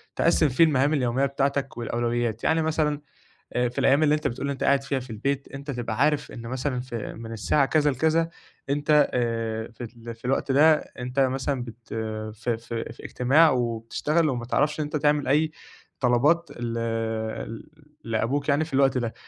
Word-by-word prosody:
تقسِّم 165 -2 +3
فيه 130 +6 +4
المهام 145 -2 +3
اليوميّة 130 -1 +1
بتاعتك 140 -1 -1
والأولويات، 120 -1 -1
يعني 160 0 +2
مثلًا 155 -2 0 0.5
أ 125 0 +1
في 120 - -9
الأيام 140 +3 +4
اللي 150 -1 +4
أنت 150 0 -1
بتقول 140 +4 -3
أنت 140 - -3
قاعد 140 -1 +3
فيها 135 -1 -2
في 125 -1 -11
البيت، 140 +5 -2
أنت 140 +1 -6
تبقى 120 -4 -3
عارف 150 -1 +2
إن 115 - -8
مثلًا 130 +1 -2
ف 125 -1 -9
من 115 0 -6
الساعة 135 +6 +2
كذا 150 0 +3
لكذا 160 +5 +1 0.4
أنت 145 0 +3
آآ 115 -2 -1
في 115 - -30
ال 115 0 -9
في 115 - -26
الوقت 135 +1 0
ده، 155 +4 +6
أنت 125 -2 -7
مثلًا 135 0 0
بت 115 -1 -11 0.5
ف 115 +2 -10
ف 115 0 -2
في 115 - -6
إجتماع 145 +6 +4
وبتشتغل 125 +6 0
وما 120 -4 -2
تعرفش 150 +5 0
إن - - +1
أنت 150 +1 -3
تعمل 145 -1 +2
أي 155 +3 +3 0.5
طلبات 140 +8 +3
ل 120 -1 -2 1.3
لأبوك 115 +6 -1
يعني 145 +2 +3
في 155 - -12
الوقت 135 -1 +3
ده. 120 -2 -3
135 Hz, 175 wpm, -25 LUFS, 120-150 Hz, 1.3 s, ده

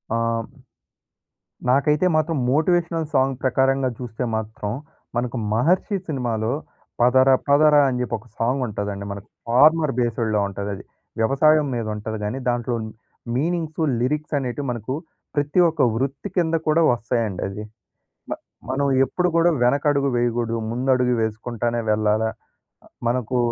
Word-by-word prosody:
ఆ! - - +2 1.5
నాకైతే 150 +5 +3
మాత్రం 155 0 +1
మోటివేషనల్ 165 +2 +1
సాంగ్ 135 -1 +2
ప్రకారంగా 135 0 +2
చూస్తే 120 -1 -5
మాత్రం, 110 -1 -4 0.4
మనకు 120 +1 -1
'మహర్షి' 175 - +2
సినిమాలో 120 -6 -1 0.5
'పదర 130 +2 +5 0.2
పదర' 150 +1 +5
అని 130 -2 -1
జేప్పి 125 -1 -1
ఒక 110 - -17
సాంగుంటదండి. 105 -5 -2
మనకు 100 +1 -8 0.2
ఫార్మర్ 150 +5 +4
బేస్‌డ్‌లో 115 -3 0
ఉంటది. 100 +1 -5
అది - - -10 0.4
వ్యవసాయం 145 +6 +4
మీద 115 -2 -2
ఉంటది 110 +1 -5
గాని, 105 +5 -2
దాంట్లో 120 0 -1 0.6
మీనింగ్స్ 160 +3 -1 0.2
లిరిక్సనేటివి, 145 -1 -1
మనకు 120 +1 -4 0.4
ప్రతి 145 +4 +1
ఒక్క 160 -2 -2
వృత్తి 135 - -2
కింద 165 -3 +2
కూడా 155 +2 +4
వస్తాయండి 115 -4 -2
అది. 100 +2 -6 0.7
మ - - -7 0.4
మనం 135 +2 0 0.2
ఎప్పుడు 180 +5 0
కూడా 170 +1 +5
వెనకడుగు 140 +2 +2
వేయగూడదు, 120 -1 0
ముందడుగే 125 +1 +1
వేసుకుంటానే 115 +2 -2
వెళ్ళాలా? 110 +1 +2 0.6
ఆహ్, - - -21 0.2
మనకు 125 0 -1
125 Hz, 125 wpm, -22 LUFS, 115-145 Hz, 1.5 s, పదర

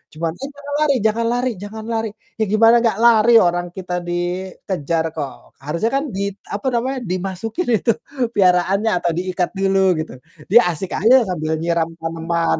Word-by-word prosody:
cuman, 165 0 -2
"Eh, 265 - -11
jangan 285 0 -9
lari 295 -3 +3
jangan 230 +2 0
lari 245 +1 0
jangan 215 +1 -7
lari." 225 -1 -1 0.3
Ya, - - +3
gimana 225 +2 +6
nggak 225 -4 +1
lari, 235 0 +6
orang 175 0 +1
kita 180 -1 -6
dikejar 175 -2 -2
kok, 145 -4 -7
harusnya 170 +10 -1
kan 275 - +1
di 195 - -2 0.3
apa 205 +6 -4
namanya, 260 +3 -1
dimasukin 195 - -3
itu 230 - +2 0.4
piaraannya 195 +2 +3
atau 175 -1 0
diikat 180 -1 -1
dulu, 195 0 +1 0.2
gitu. 155 - -5 0.4
Dia 235 - +8
asik 185 +4 -6
aja 245 +4 +6
sambil 160 -2 -1
nyiram 170 -1 +1
taneman, 165 +1 -1
190 Hz, 160 wpm, -19 LUFS, 175-225 Hz, 0.4 s, Dia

